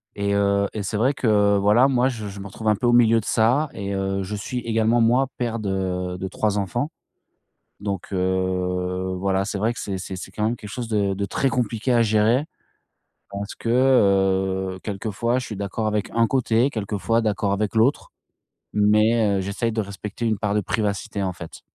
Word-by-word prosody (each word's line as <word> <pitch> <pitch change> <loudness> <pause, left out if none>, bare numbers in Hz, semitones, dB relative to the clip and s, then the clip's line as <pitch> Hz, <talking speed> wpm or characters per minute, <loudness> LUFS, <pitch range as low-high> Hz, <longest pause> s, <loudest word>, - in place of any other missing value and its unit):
et 100 0 -1
heu, 100 0 +2
et 105 - -3
c'est 100 +2 -2
vrai 130 +6 +2
que, 105 -6 +3
voilà, 105 +7 +4
moi, 130 -1 +2
je 110 -4 -5
je 100 0 -8
me 100 - -7
retrouve 110 +2 -7
un 105 - +4
peu 120 - -3
au - - +4
milieu 115 -1 +5
de - - -13
ça 125 +7 +2
et, 100 -1 -4
heu, 95 0 -1
je 105 +3 -4
suis 125 +5 -4
également, 115 0 +1
moi, 120 +4 +3
père 115 -2 -2
de 90 -2 -2
de 95 - -4
3 105 +2 -1
enfants. 120 - -2 0.9
Donc, 100 -1 -4
heu, 95 0 -1
voilà, 95 +1 0
c'est 105 - -3
vrai 110 +4 +1
que - - -8
c'est 95 -1 -3
c'est 95 0 -6
c'est 95 - -8
quand 105 +2 -3
même 115 +2 +1
quelque 105 -3 -10
chose 120 0 -5
de 100 -3 +1
de 100 +1 -2
très 135 +6 0
compliqué 120 -1 -1
à 120 - +5
gérer, 110 +5 +3 0.9
parce 100 +1 -5
que, 115 - -6
heu, 95 -6 +2
quelquefois 110 +4 -2
je 125 - -4
suis 105 - -6
d'accord 100 +2 -3
avec 105 -1 -1
un 115 0 +2
côté, 125 0 +2
quelquefois 110 +1 -1
d'accord 105 -2 0
avec 105 +2 -1
l'autre, 125 +6 +2 0.6
mais 105 0 +3
heu, - - 0
j'essaye 100 +5 -2
de 110 -1 -1
respecter 100 +3 -6
une 110 -2 0
part 105 0 -1
de 105 - +2
privacité, 100 -1 -2
en 95 -2 -2
fait. 85 -3 -10
105 Hz, 200 wpm, -23 LUFS, 100-115 Hz, 0.9 s, milieu